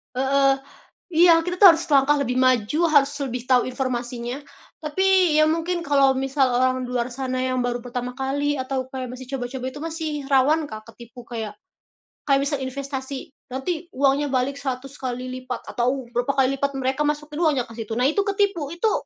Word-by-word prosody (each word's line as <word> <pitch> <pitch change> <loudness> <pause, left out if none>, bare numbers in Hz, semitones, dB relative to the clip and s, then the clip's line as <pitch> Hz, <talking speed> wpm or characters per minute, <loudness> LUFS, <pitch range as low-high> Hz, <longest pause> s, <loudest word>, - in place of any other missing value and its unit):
Heeh, 275 +1 +3 0.6
iya 335 0 +6
kita 360 +2 -4
tuh 370 -4 +9
harus 325 - -3
selangkah 290 -2 +3
lebih 250 0 -1
maju, 255 +1 +2
harus 285 -2 +5
lebih 250 -3 -3
tahu 250 -1 +4
informasinya, 250 -1 -3 0.4
tapi 370 +1 +2
ya 310 0 +5
mungkin 335 +2 -1
kalau 275 -3 +3
misal 270 +1 +1 0.2
orang 255 0 +1
di - - -8
luar 245 0 -1
sana 255 0 -3
yang 255 0 -1
baru 245 0 -1
pertama 245 0 -5
kali 280 +2 -1
atau 260 0 -2
kayak 260 -2 -5
masih 255 0 -9
coba-coba 255 0 -4
itu 290 - -8
masih 320 -1 -4 0.2
rawan 290 +4 +3
Kak, 215 0 -8
ketipu 235 +1 -13
kayak 220 -3 -6 0.7
kayak 275 0 +5
misal 285 0 -1
investasi 270 0 -6 0.2
nanti 315 +6 -3
uangnya 280 +1 +2
balik 260 +1 0
100 270 -1 -5
kali 255 -2 -4 0.2
lipat 255 -1 -5
atau 255 +2 0
berapa 245 +3 +1
kali 265 -1 +4
lipat 280 +1 -1
mereka 265 +2 -1
masukin 300 0 -2
uangnya 290 -7 +2
ke 230 - -12
situ. 225 -1 -5
Nah 250 - +2
itu 315 +8 +1
ketipu 395 -7 0
itu, 345 +6 0
270 Hz, 180 wpm, -23 LUFS, 255-300 Hz, 0.7 s, tuh